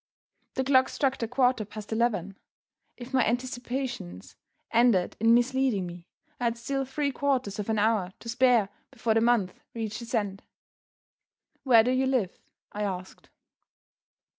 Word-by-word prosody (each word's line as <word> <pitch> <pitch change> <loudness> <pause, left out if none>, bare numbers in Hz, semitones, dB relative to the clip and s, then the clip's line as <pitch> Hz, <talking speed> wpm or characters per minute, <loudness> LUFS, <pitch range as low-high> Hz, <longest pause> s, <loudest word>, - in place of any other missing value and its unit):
The 265 - 0
clock 260 -1 +4
struck 270 -2 0
the 230 - -2
quarter 250 -1 +2
past 210 +1 -8
eleven. 210 -5 0 0.6
If 245 +2 -10
my 255 -2 +4
anticipations 245 - -4 0.4
ended 230 -6 +3
in 225 +2 +5
misleading 245 -5 +1
me, 175 0 -9 0.3
I 245 - -1
had 235 0 0
still 270 +3 -2
three 280 +2 -1
quarters 260 -8 -1
of 210 - -4
an 220 - +1
hour 210 -3 +1
to - - -11
spare 240 -3 +3 0.2
before 225 -1 -1
the 225 - +3
month 230 -6 +2 0.2
reached 220 0 -4
its 235 +1 -4
end. 200 -3 -2 1.2
"Where 235 -4 +6
do 250 - +1
you 260 +1 +1
live?" 245 -9 0 0.4
I 210 - -5
asked. 185 -2 -5
235 Hz, 150 wpm, -27 LUFS, 210-255 Hz, 1.2 s, Where